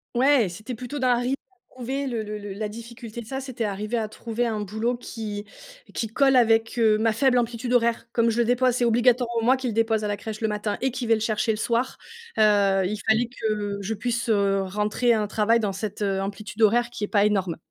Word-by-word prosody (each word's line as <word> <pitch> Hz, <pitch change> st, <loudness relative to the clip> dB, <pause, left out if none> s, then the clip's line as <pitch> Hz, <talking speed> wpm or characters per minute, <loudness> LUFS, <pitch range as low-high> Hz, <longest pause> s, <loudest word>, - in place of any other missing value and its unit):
Ouais, 260 Hz, -3 st, +4 dB
c'était 215 Hz, +8 st, -7 dB
plutôt 250 Hz, +5 st, -6 dB
d'un 255 Hz, -2 st, +3 dB
rythme 245 Hz, +2 st, -1 dB, 0.2 s
à -, -, -33 dB, 0.2 s
trouver. 265 Hz, +3 st, -3 dB
Le 240 Hz, -4 st, -2 dB
le 210 Hz, 0 st, -5 dB
le 205 Hz, -1 st, -7 dB
la 210 Hz, +1 st, -4 dB
difficulté 235 Hz, +1 st, -9 dB
de -, -, -11 dB
ça, 265 Hz, +4 st, -4 dB
c'était 260 Hz, -3 st, -5 dB
arriver 210 Hz, +3 st, -2 dB
à 220 Hz, -1 st, -1 dB
trouver 230 Hz, +2 st, -3 dB
un 220 Hz, -2 st, -1 dB
boulot 220 Hz, +4 st, -1 dB
qui 215 Hz, -4 st, -6 dB, 0.5 s
qui -, -, -1 dB
colle 270 Hz, +4 st, +3 dB
avec, 225 Hz, -1 st, +3 dB
heu, 220 Hz, -2 st, +4 dB
ma 225 Hz, 0 st, +2 dB
faible 255 Hz, +1 st, +3 dB
amplitude 240 Hz, +1 st, -2 dB
horaire. 235 Hz, -1 st, +2 dB
Comme 230 Hz, -1 st, +3 dB
je 230 Hz, -, -1 dB
le 235 Hz, -, +3 dB
dépose, 245 Hz, +1 st, +2 dB
c'est 245 Hz, -, +1 dB
obligatoirement 240 Hz, 0 st, +2 dB
moi 255 Hz, +3 st, +4 dB
qui 260 Hz, -, -7 dB
le 230 Hz, -, -1 dB
dépose 225 Hz, -1 st, +1 dB
à -, -, 0 dB
la 205 Hz, -, -1 dB
crèche, 215 Hz, +1 st, -7 dB
le 220 Hz, -, +1 dB
matin 210 Hz, 0 st, -2 dB
et 265 Hz, -, +1 dB
qui 250 Hz, -1 st, -4 dB
vais 225 Hz, -, +5 dB
le -, -, -3 dB
chercher 220 Hz, +1 st, -1 dB
le 215 Hz, -, -2 dB
soir. 235 Hz, +3 st, -1 dB, 0.4 s
Heu, 200 Hz, -3 st, +4 dB
il 210 Hz, +3 st, -2 dB
fallait 220 Hz, +2 st, +4 dB
que 210 Hz, -4 st, -3 dB
je 210 Hz, +3 st, -2 dB
puisse, 235 Hz, +2 st, -2 dB
heu, 200 Hz, -2 st, +2 dB
rentrer 210 Hz, +5 st, +1 dB
un 215 Hz, -2 st, +1 dB
travail 220 Hz, +3 st, +2 dB
dans 205 Hz, -3 st, -1 dB
cette, 210 Hz, +1 st, -4 dB
heu, 195 Hz, -1 st, 0 dB
amplitude 210 Hz, +2 st, -6 dB
horaire 235 Hz, +3 st, +4 dB
qui 215 Hz, -, -6 dB
est -, -, -10 dB
pas 205 Hz, -1 st, +3 dB
énorme. 195 Hz, -5 st, 0 dB
225 Hz, 235 wpm, -25 LUFS, 210-240 Hz, 0.5 s, vais